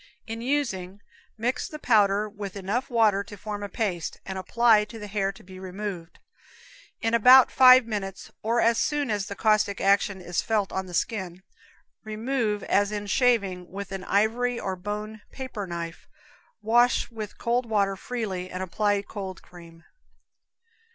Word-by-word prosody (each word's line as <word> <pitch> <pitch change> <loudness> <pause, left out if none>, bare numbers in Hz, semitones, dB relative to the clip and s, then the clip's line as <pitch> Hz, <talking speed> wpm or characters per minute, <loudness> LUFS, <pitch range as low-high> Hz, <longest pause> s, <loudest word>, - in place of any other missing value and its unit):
In 225 0 -6
using 210 -9 -2 0.4
mix 240 +3 -1
the 305 - -8
powder 210 -6 +3
with 205 -2 -7
enough 200 +6 -2
water 215 -5 +3
to 205 - -11
form 205 +1 -6
a 205 - -5
paste, 185 -6 -3
and 190 - -5
apply 220 +3 +3
to 225 - -11
the 210 - -7
hair 195 -1 -1
to 205 +3 -17
be 185 0 -12
removed. 190 -2 -6 0.8
In 225 0 0
about 250 +3 +7
five 255 -1 +8
minutes, 200 -4 -5
or 230 +2 +1
as 230 0 +3
soon 290 -5 0
as 205 0 -2
its 200 - -7
caustic 215 -2 +2
action 200 0 +2
is 175 -1 -2
felt 210 -3 0
on 190 0 -3
the 175 - -6
skin, 185 -3 -2 0.6
remove, 220 -1 -2
as 205 +1 +2
in 205 -1 -4
shaving, 200 -6 +1
with 200 +1 -7
an 195 -1 -5
ivory 235 +4 +1
or 190 -1 -3
bone 210 +3 -6
paper 250 -7 -6
knife, 170 -1 -6 0.6
wash 240 +2 +3
with 215 -2 -7
cold 240 +1 0
water 200 -3 +1
freely, 190 -5 -4
and 185 +1 -4
apply 205 +2 0
cold 195 -2 -7
cream. 170 -2 -15
205 Hz, 160 wpm, -26 LUFS, 190-230 Hz, 0.8 s, five